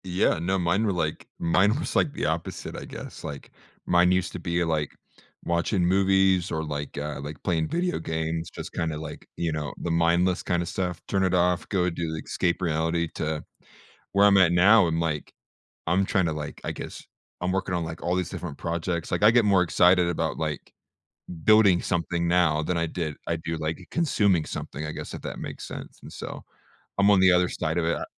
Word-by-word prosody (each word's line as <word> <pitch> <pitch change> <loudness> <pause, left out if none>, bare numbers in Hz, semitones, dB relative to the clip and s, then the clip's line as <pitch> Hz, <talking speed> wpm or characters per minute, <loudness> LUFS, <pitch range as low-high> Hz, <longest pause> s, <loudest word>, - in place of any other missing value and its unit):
Yeah, 90 -2 +1
no, 95 +4 0
mine 90 +4 +1
were 100 - +1
like 80 -3 -2
mine 95 +7 +3
was - - -4
like 145 - +2
the - - -2
opposite, 80 +2 -3
I - - -6
guess. - - -9
Like, 70 -1 -7 0.3
mine 90 0 +4
used 90 -1 +1
to - - -6
be, 85 0 0
like, 80 -3 -1 0.5
watching 85 +2 +1
movies 95 -1 +3
or, 80 0 -1
like, 75 -2 -5
uh 75 0 -4
like, 75 0 -7
playing 80 -3 0
video 175 +1 -1
games, 80 0 -3
just - - -7
kinda, 80 -3 -2
like, 75 0 -8
you 85 -1 -1
know, 75 -3 -3
the 85 - -3
mindless 85 +2 +2
kind 90 -2 0
of - - -7
stuff. 90 -3 -3
Turn 95 -1 +1
it 95 -1 +2
off, 90 0 +1
go 90 -3 +1
do 85 -1 -3
the 80 - -4
escape 85 0 -1
reality, 80 0 0
to 80 -1 -2 0.7
where 100 +1 +5
I'm 100 -1 +6
at 90 -3 +5
now 95 +3 +6
and, 80 0 0
like, 75 -3 -2 0.5
I'm 90 +4 +2
trying 95 -4 +1
to, 80 - 0
like 75 -1 -6
I - - -2
guess, - - -8 0.4
I'm 90 +1 -1
working 95 -1 -1
on 85 -1 -1
like 80 0 -6
all 90 - 0
these 90 -1 -1
different 80 -6 -6
projects. 85 0 -3
Like, - - -1
I 105 - +9
get 120 -1 +4
more 100 -3 +4
excited 90 +1 +4
about, 85 - -1
like, 75 -2 -4 0.7
building 110 -5 +6
something 85 0 -1
now 85 -3 +3
than 90 +2 -1
I 85 0 +1
did 80 -2 -3
I 85 - +1
do, 80 0 -4
like, 80 +3 -4
consuming 100 - +2
something, 75 0 -6
I - - -4
guess, - - -7
if - - -7
that - - -6
makes - - -7
sense. - - -9
And, - - -11
so, - - -7 0.6
I'm 100 +1 +5
on 100 - +5
the 95 -1 +7
other 90 0 +3
side 80 +2 -2
of 85 - 0
it 85 - +1
a - - -4
85 Hz, 215 wpm, -26 LUFS, 80-95 Hz, 0.7 s, I